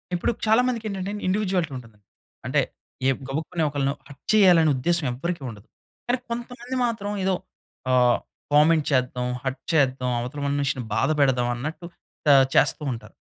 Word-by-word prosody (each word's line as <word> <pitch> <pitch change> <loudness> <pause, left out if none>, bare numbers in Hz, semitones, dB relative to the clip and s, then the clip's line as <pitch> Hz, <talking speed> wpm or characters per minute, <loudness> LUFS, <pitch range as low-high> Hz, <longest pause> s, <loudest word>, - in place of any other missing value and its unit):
ఇప్పుడు 175 - 0
చాలా 220 +3 +5
మందికి 235 -3 -2
ఏంటంటే 195 0 -4 0.2
ఇండివిడ్యువాలిటీ 185 -5 0
ఉంటది. 115 -4 -13 0.5
అంటే - - +2 0.5
ఏ - - +5 0.2
గబుక్కుని 160 +4 -2
ఒకళ్ళని 140 -1 0
హర్ట్ 140 - -15
చేయాలనే 180 -7 +6
ఉద్దేశ్యం 165 +4 0
ఎవ్వరికీ 170 +6 -3
ఉండదు. 105 -2 -12 0.4
కానీ 245 +1 +2
కొంతమంది 240 +2 -5
మాత్రం, 220 -4 -2
ఏదో 190 0 +2 0.6
ఆహ్, 125 -1 +4 0.3
కామెంట్ 155 +1 +5
చేద్దాం, 125 -2 0 0.2
హర్ట్ 135 0 -3
చేద్దాం, 130 -4 +2
అవతల 125 +5 -5
మనిషిని 140 -2 -1
బాధ - - +1
పెడదాం. 130 -3 +3
అన్నట్టు 155 +8 -5 0.5
ఆహ్, 135 -1 +7
చేస్తూ - - +3
ఉంటారు. 115 - -10
150 Hz, 145 wpm, -24 LUFS, 130-190 Hz, 0.6 s, ఆహ్